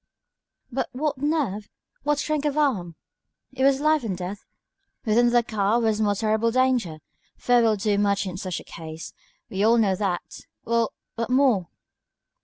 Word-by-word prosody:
"But 255 - -2
what 285 +1 -2
nerve! 275 -9 -1 0.3
what 295 +1 +1
strength 300 0 -1
of 295 0 -2
arm!" 205 - 0 0.6
"It 265 - -5
was 275 0 +4
life 305 -1 +2
and 195 -5 -3
death. 190 +3 -6 0.6
Within 240 +2 +4
the 240 0 +3
car 215 0 +1
was 220 -2 +1
more 205 -1 +2
terrible 220 +2 +1
danger. 245 -10 +1 0.4
Fear 245 -1 +3
will 225 -2 +3
do 205 0 0
much 200 -1 +1
in 185 -2 -5
such 185 -1 -4
a - - -11
case. 160 -1 -9 0.4
We 195 +1 -1
all 230 +2 +5
know 200 -4 +3
that. 185 -3 -4 0.2
Well! 230 -1 +1 0.2
what 230 0 -2
more?" 250 -9 +3
225 Hz, 165 wpm, -24 LUFS, 200-260 Hz, 0.6 s, all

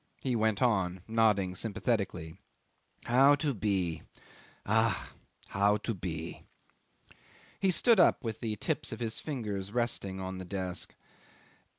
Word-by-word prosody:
." - - -43
He 130 -2 -1
went 110 -2 +1
on 95 -6 +1
nodding 105 -5 +2
sympathetically.... 100 -5 -2 0.7
"How 135 +4 +6
to 145 -1 -1
be! 95 -6 -1 0.6
Ach! 110 +2 +1 0.4
How 100 +1 +3
to 115 +2 -3
be." 85 -3 -5 1.2
'He 195 - +2
stood 225 +4 +4
up 175 - +5
with 110 -2 -4
the 110 -2 -2
tips - - -2
of - - -5
his 115 -2 -3
fingers 105 -9 -4
resting 115 -5 -1
on 95 0 -5
the - - -5
desk. 90 -2 -4
105 Hz, 130 wpm, -31 LUFS, 95-120 Hz, 1.2 s, How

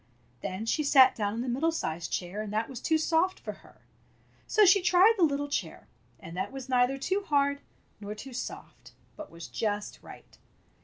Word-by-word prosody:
Then 190 +4 -4
she 305 +7 0
sat 265 -2 +6
down 205 -1 -2
in 230 - -3
the 255 - -4
middle 275 +7 +1
sized 165 - -4
chair, 185 +4 -3
and 215 -1 -6
that 220 +2 -1
was 260 -2 -8
too 320 - +2
soft 325 +4 +1
for - - -6
her. - - -20 0.7
So 430 -1 +5
she 395 +1 +6
tried 365 +5 +5
the 380 - +1
little 290 -2 +1
chair, 185 - -4 0.3
and 165 +1 -10
that 190 +2 -3
was 270 -1 -8
neither 250 +1 +2
too 375 +9 -1
hard 280 -1 +1 0.4
nor 210 0 -6
too 255 +5 -10
soft, 240 - -8 0.2
but 310 -1 -9
was 170 0 -10
just 205 -2 -3
right. - - -14
265 Hz, 195 wpm, -29 LUFS, 210-315 Hz, 0.7 s, sat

